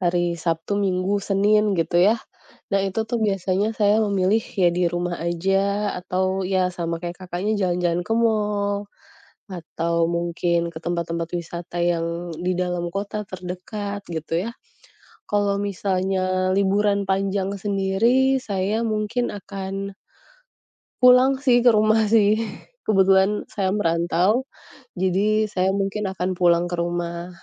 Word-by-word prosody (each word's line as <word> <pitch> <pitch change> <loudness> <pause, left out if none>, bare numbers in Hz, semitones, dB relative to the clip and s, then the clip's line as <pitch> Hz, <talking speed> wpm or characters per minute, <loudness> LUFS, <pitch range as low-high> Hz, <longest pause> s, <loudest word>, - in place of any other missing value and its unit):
hari 175 -1 +1
Sabtu, 165 +4 -2
Minggu, 195 +1 0
Senin, 205 0 +2
gitu 170 +1 +2
ya. 230 - +3 0.5
Nah, 195 -1 +1
itu 195 +3 -2
tuh 240 - -1
biasanya 200 0 0
saya 210 -1 +3
memilih, 200 +2 +1 0.2
ya 175 - +6
di 180 - +2
rumah 175 0 -2
aja, 195 +4 0
atau, 185 +1 -1
ya, 185 -1 +1
sama 170 -2 -4
kayak 175 0 -5
Kakaknya 185 +4 -2
jalan-jalan 175 -2 0
ke 225 - -3
mall, 210 -3 +1 0.6
atau 170 -2 -2
mungkin 170 0 0
ke 165 -1 -8
tempat-tempat 170 -1 -2
wisata 170 +1 -7
yang 170 0 -1
di 180 +3 -2
dalam 175 -1 -2
kota 205 +2 -4
terdekat, 195 +2 -6
gitu, 165 +2 -2
ya. 230 - -4 0.8
Kalau 205 -1 +1
misalnya 185 -1 0
liburan 200 0 +2
panjang 195 0 0
sendiri, 210 +7 +1
saya 200 +2 -1
mungkin 220 +2 -1
akan 195 0 -6 1.1
pulang 250 +2 +6
sih, 245 -3 +5
ke 245 0 +6
rumah 215 0 +3
sih. 215 0 +4 0.5
Kebetulan 195 0 +3
saya 195 -2 -1
merantau, 180 +6 +1 0.5
jadi 200 +4 +2
saya 190 -2 0
mungkin 195 +1 -1
akan 185 0 -2
pulang 175 -1 +3
ke 175 - -3
rumah 170 0 -3
190 Hz, 130 wpm, -23 LUFS, 175-205 Hz, 1.1 s, ya